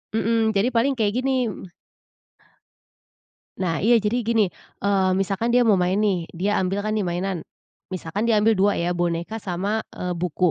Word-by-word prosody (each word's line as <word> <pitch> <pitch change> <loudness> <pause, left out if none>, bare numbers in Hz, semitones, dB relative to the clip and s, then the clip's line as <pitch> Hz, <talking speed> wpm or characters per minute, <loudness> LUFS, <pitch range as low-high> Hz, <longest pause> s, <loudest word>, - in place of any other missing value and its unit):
Mhm, 225 0 +2
jadi 200 +5 +3
paling 260 +4 +2
kayak 210 -2 +1
gini, 260 -3 +1
mhm 190 -3 -9 1.9
Nah, 170 -4 -1
iya 230 0 +4
jadi 225 +2 -1
gini, 220 -5 +2 0.3
eee, 195 -2 +2
misalkan 195 +5 0
dia 245 - +5
mau 210 -5 +4
main, 180 +1 +1
nih, 190 -6 +1
dia 200 +4 0
ambil, 190 +2 -1
kan, 215 - -2
di 205 -4 0
mainan. 175 0 -3 0.4
Misalkan 185 +4 -3
dia 230 - +3
ambil 225 0 +4
2 205 +1 +4
ya, 170 +1 -1
boneka 175 +4 -2
sama, 195 +3 -2 0.2
eee, 180 - -4
buku. 180 0 +1
200 Hz, 170 wpm, -23 LUFS, 180-225 Hz, 1.9 s, dia